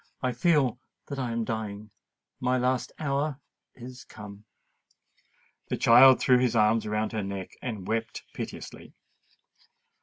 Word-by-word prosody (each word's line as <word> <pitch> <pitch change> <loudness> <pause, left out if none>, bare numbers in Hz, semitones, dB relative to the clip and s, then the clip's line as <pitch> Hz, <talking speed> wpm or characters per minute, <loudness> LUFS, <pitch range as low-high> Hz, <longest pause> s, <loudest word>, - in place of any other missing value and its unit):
"I 130 - +1
feel 130 -2 +2 0.3
that 140 -2 -4
I 125 -3 -2
am 115 0 -1
dying—my 110 +3 -5
last 125 0 0
hour 140 -1 -1 0.4
is 125 +1 -10
come!" 105 0 -12 1.2
The - - -2
child 130 +3 +7
threw 125 -1 +4
his 125 -2 +1
little 105 -1 +5
arms 115 0 0
about 105 0 -1
her 110 - -2
neck, 95 -1 -5
and 110 -7 -5
wept 115 0 -3
piteously. - - -8
120 Hz, 130 wpm, -27 LUFS, 110-130 Hz, 1.2 s, child